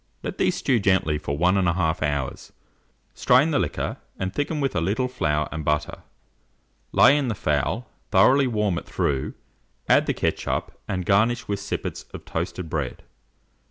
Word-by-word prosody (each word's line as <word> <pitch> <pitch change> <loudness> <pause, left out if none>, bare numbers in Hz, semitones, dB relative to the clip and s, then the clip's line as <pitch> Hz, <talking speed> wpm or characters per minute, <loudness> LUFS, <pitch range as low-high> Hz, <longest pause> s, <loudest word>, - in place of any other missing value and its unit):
Let - - -5
these - - +2
stew 125 - +1
gently 95 -7 +2
for 70 -1 -3
1 90 +3 +3
1/2 85 -3 +1
hour, 70 -4 -1 0.8
strain 130 +6 +4
the 145 - +2
liquor, - - -2 0.2
and 95 0 -3
thicken 150 +1 -2
with 135 -2 -1
a 80 - +1
little 105 +9 0
flour 75 -11 -1
and 80 -1 -4
butter. 75 0 -1 0.9
Lay 140 - +6
in 145 -3 0
the 115 - -1
fowl, 75 - -1 0.2
thoroughly 130 +8 +5
warm 105 -7 0
it - - -16
through, 70 -2 -1 0.5
add - - +4
the - - 0
ketchup, - - -1 0.2
and 90 -2 -2
garnish 110 +6 +2
with 100 -1 -2
sippets 100 - -4
of - - -10
toasted 90 -3 -4
bread. 75 -5 -4
95 Hz, 160 wpm, -24 LUFS, 75-120 Hz, 0.9 s, Lay